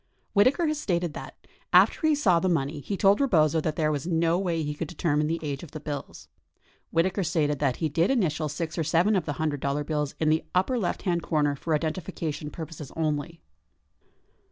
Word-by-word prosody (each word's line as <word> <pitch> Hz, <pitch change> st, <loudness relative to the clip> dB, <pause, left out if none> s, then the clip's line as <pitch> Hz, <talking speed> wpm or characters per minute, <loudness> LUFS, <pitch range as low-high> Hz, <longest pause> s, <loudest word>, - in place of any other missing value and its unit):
Whitaker 255 Hz, -, +4 dB
has 305 Hz, -1 st, 0 dB
Stated 175 Hz, -, -1 dB
that, -, -, -9 dB, 0.3 s
after 315 Hz, -, +5 dB
he 310 Hz, -, +4 dB
saw 190 Hz, -12 st, +3 dB
the 185 Hz, -, 0 dB
money 150 Hz, -2 st, 0 dB
he 195 Hz, +7 st, -4 dB
told 200 Hz, +5 st, +4 dB
Rebozo 160 Hz, -, +3 dB
that 155 Hz, 0 st, -2 dB
there 155 Hz, -1 st, +1 dB
was 145 Hz, +1 st, -3 dB
no 165 Hz, 0 st, +2 dB
way 170 Hz, -4 st, -1 dB
he 150 Hz, 0 st, -2 dB
could 155 Hz, +2 st, -4 dB
determine 150 Hz, -3 st, 0 dB
the 165 Hz, +1 st, -1 dB
age 140 Hz, -2 st, -3 dB
of 165 Hz, -, -11 dB
the 155 Hz, -, -5 dB
bills. 145 Hz, -2 st, -7 dB, 0.6 s
Whitaker 185 Hz, +4 st, +1 dB
stated 150 Hz, -4 st, 0 dB
that 135 Hz, -4 st, +1 dB
he 160 Hz, -, -1 dB
did 165 Hz, +5 st, +1 dB
initial 160 Hz, -, +1 dB
six 165 Hz, +3 st, -4 dB
or -, -, +1 dB
seven 170 Hz, +7 st, +3 dB
of 180 Hz, -5 st, 0 dB
the 145 Hz, -, -1 dB
$100 145 Hz, -1 st, -2 dB
bills 150 Hz, -2 st, -2 dB
in 155 Hz, -, +2 dB
the 160 Hz, +1 st, +2 dB
upper 235 Hz, +8 st, +2 dB
lefthand 175 Hz, -2 st, -1 dB
comer 145 Hz, -3 st, +1 dB
for 155 Hz, +2 st, 0 dB
identifi 160 Hz, +2 st, -4 dB
cation 155 Hz, -2 st, -4 dB
purposes 155 Hz, -3 st, -8 dB
only. 160 Hz, +1 st, -2 dB
160 Hz, 200 wpm, -26 LUFS, 150-180 Hz, 0.6 s, after